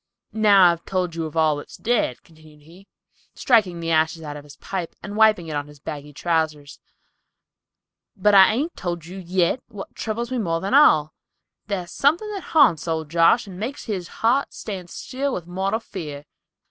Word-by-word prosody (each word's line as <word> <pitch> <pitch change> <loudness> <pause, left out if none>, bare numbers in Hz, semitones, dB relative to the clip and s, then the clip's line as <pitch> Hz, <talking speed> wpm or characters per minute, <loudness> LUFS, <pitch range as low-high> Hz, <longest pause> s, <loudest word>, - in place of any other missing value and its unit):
"I've 220 - -6
now 195 -5 +6
told 180 0 -3
you 165 -1 -3
of 155 - -9
all 155 -2 +3
that's 145 - -10
dead," 225 - -1
continued 155 -2 -19
he, 175 +6 -17 0.5
striking 200 -9 +2
the 165 0 -3
ashes 160 +1 +1
out 145 -1 -6
of 145 - -9
his 145 -1 -14
pipe 185 -4 -5
and 205 0 -7
wiping 215 -6 +4
it 155 - -4
on 145 0 -3
his 145 -1 -15
bagging 145 0 -8
trousers, 155 -3 -2 1.4
"but 210 +2 +3
I 195 -1 +9
hain't 285 +10 -1
told 175 -3 -4
you 185 +3 -9
yit 180 +5 0
what 200 -2 -9
troubles 235 +2 -4
me 255 - -1
more 165 -6 -1
than 195 +6 -3
all. 155 - +5 0.5
Thar's 185 -4 -4
something 320 +10 +1
haunts 275 - +3
old 160 -2 -3
Josh, 170 +8 +4
and 185 -2 -10
makes 250 +7 -5
his 190 -6 -4 0.2
heart 260 +5 +2
stand 185 -5 -7
still 270 +7 -4
with 175 - -6
mortal 190 +5 -2
fear. 150 -10 -8
180 Hz, 180 wpm, -23 LUFS, 160-215 Hz, 1.4 s, I